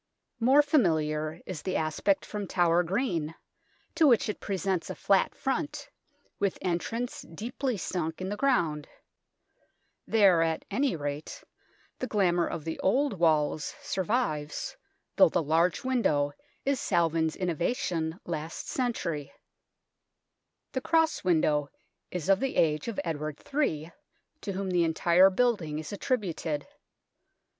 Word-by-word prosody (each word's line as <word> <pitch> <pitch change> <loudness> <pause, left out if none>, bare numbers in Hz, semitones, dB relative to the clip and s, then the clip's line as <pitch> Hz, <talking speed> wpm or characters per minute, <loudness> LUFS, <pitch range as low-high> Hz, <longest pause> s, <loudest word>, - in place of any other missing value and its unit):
More 265 +5 +5
familiar 160 - +1
is 175 -5 -6
the 185 - -3
aspect 160 +5 +1
from 205 -2 -5
Tower 175 -1 +3
Green, 175 - -1 0.6
to 320 - +4
which 235 -5 +4
it 210 - -3
presents 190 -2 -2
a - - -4
flat 195 -1 +2
front, 270 +3 -3 0.5
with 200 -2 0
entrance 195 +7 -2
deeply 240 - -4
sunk 165 -3 -3
in 185 - -3
the 205 - -2
ground. 175 - +1 1.2
There, 195 -6 +5
at 165 -1 0
any 275 -5 +1
rate, 145 0 -5 0.6
the 255 - -2
glamour 180 -6 +2
of 155 - -5
the 160 - -4
old 275 +7 +2
walls 155 -2 +2
survives, 185 -7 -1 0.4
though 285 - +7
the 175 - 0
large 165 +4 +2
window 155 - +1 0.3
is 275 -2 +1
Salvin's 165 -3 +1
innovation 170 -2 -1
last 160 -1 -5
century. 170 - -2 1.4
The 260 - -2
cross 320 +1 +2
window 155 -5 +2 0.4
is 180 -2 -4
of 195 0 +4
the 270 -1 -2
age 150 +1 +2
of 230 -4 -3
Edward 155 -3 -4
III, 165 - 0 0.5
to 200 - -4
whom 190 0 -3
the 175 -1 +3
entire 170 +3 +5
building 190 -8 +1
is 155 +4 -6
attributed. 175 - -2
175 Hz, 130 wpm, -29 LUFS, 160-225 Hz, 1.4 s, though